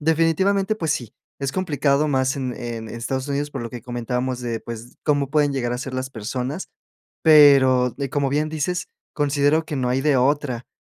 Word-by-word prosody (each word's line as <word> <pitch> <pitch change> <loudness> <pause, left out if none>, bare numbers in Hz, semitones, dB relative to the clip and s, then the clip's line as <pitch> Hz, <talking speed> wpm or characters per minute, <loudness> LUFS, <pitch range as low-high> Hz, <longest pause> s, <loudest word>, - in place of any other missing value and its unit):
Definitivamente, 165 +6 +2
pues 160 -7 0
sí, 120 -8 -5 0.3
es 140 -1 -1
complicado, 145 -4 +1
más 130 -2 +1
en 130 -2 -3
en 115 -2 -6
en - - -8
Estados 130 +3 -3
Unidos, 145 +1 -2
por 135 -4 -5
lo 115 - -4
que 120 -3 -8
comentábamos, 125 +1 -3
de 120 -2 -3
pues 115 +1 -8
cómo 145 -2 +1
pueden 145 0 +2
llegar 120 -3 -1
a 125 - -2
ser 130 +1 -5
las 130 0 -3
personas, 125 - -4 0.5
pero 135 -5 +6
de 140 -2 -4
como 140 -1 0
bien 150 +2 0
dices, 160 +4 -2 0.3
considero 145 +2 +2
que 155 - -4
no 125 -2 0
hay 130 +2 +1
de 150 -2 +3
otra. 130 -2 0
140 Hz, 195 wpm, -22 LUFS, 125-150 Hz, 0.5 s, pero